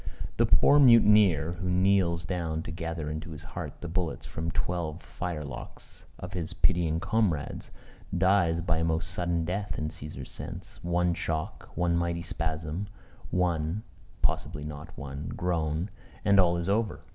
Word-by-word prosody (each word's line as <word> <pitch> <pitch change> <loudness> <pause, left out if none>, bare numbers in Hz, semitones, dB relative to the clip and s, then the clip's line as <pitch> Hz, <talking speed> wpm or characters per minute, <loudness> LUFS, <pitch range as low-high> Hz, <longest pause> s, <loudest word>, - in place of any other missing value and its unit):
The - - +4
poor 145 - +6
mutineer, 105 - +6
who 90 - -1
kneels 90 -2 +3
down 85 -3 -2
to - - -6
gather 80 -1 -4
into 80 +2 -4
his 75 -2 -8
heart - - -7
the 85 - -4
bullets 85 0 -2
from 80 +2 -3
twelve 85 -2 -2
firelocks 75 -6 -7
of 90 +1 -7
his 85 -3 -3
pitying 80 -2 +2
comrades, 95 -9 0 0.5
dies 90 -3 +3
by 85 -2 +1
a - - +1
most 80 +1 0
sudden 85 -1 0
death 95 0 -2
in 75 0 -1
Cæsar's 75 -4 -8
sense: - - -8
one 85 0 +2
shock, 80 -2 -3
one 85 -1 +2
mighty 85 0 0
spasm, 80 +3 -3 0.4
one 90 +2 0 0.4
(possibly 75 - 0
not 75 +1 -6
one) 70 +1 -6
groan, 85 0 0 0.3
and 100 0 +6
all 85 -2 +4
is 85 +1 -2
over. 105 +1 +1
85 Hz, 150 wpm, -29 LUFS, 80-90 Hz, 0.5 s, poor